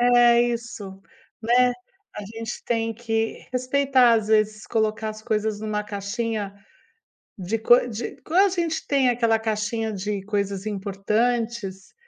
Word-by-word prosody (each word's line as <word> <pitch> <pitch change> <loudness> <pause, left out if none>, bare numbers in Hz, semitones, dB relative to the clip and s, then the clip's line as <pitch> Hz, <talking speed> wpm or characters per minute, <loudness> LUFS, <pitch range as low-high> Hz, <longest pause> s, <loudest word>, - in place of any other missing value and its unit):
é 240 -1 +6
isso, 230 -5 -4 0.4
né. 245 +2 +4 0.4
A 210 - -5
gente 225 +2 -7
tem 225 -1 0
que 225 -1 -2
respeitar, 255 -1 +3
às 220 -2 0
vezes, 215 0 +2
colocar 220 -1 0
as 215 0 -10
coisas 215 -2 -1
numa 210 -1 -2
caixinha 205 0 -3 0.9
de 195 +4 -2
coi 240 +2 +5
de 230 +2 -5
quando 350 +5 +3
a - - +2
gente 335 -3 -2
tem 270 -3 +3
aquela 230 -2 +2
caixinha 220 0 -2
de 200 0 -3
coisas 200 -1 -2
importantes, 210 0 -2
225 Hz, 135 wpm, -24 LUFS, 210-240 Hz, 0.9 s, é